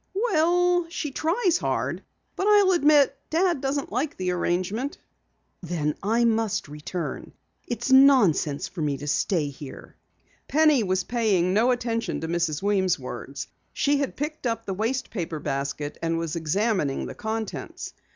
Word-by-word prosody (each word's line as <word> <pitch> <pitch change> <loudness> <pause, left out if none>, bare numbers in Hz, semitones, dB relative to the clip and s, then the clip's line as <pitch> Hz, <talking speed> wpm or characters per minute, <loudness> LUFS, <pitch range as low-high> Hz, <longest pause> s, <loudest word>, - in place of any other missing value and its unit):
"Well, 355 -4 +2
she 305 -3 -4
tries 345 - +1
hard, - - -2 0.3
but 385 - -1
I'll 410 -2 +6
admit 295 -5 +4
Dad 340 -3 +1
doesn't 275 +1 -2
like 265 +7 -2
the 185 -1 -1
arrangement." 185 +9 -1 0.6
"Then 160 -4 -1
I 225 +4 +2
must 225 -5 0
return. 150 +4 -6 0.3
It's 240 +2 -3
nonsense 255 - +5
for 175 - -7
me 145 -2 0
to 145 - -8
stay 150 +1 0
here." 140 0 -11 0.5
Penny 305 -3 +4
was 185 -2 0
paying 200 -7 +1
no 225 +5 +3
attention 235 -2 -1
to 160 - -3
Mrs. 165 -1 -1
Weems' 195 -3 +2
words. 135 +1 -7 0.3
She 285 0 +2
had 280 -1 -2
picked 300 -2 -3
up 230 -1 -2
the 195 - -3
waste 230 +7 -2
paper 170 -6 -3
basket 140 +1 -3
and 165 0 0
was 165 -1 -3
examining 170 -2 0
the - - -6
contents. 220 -1 -5
220 Hz, 150 wpm, -25 LUFS, -, 0.6 s, I'll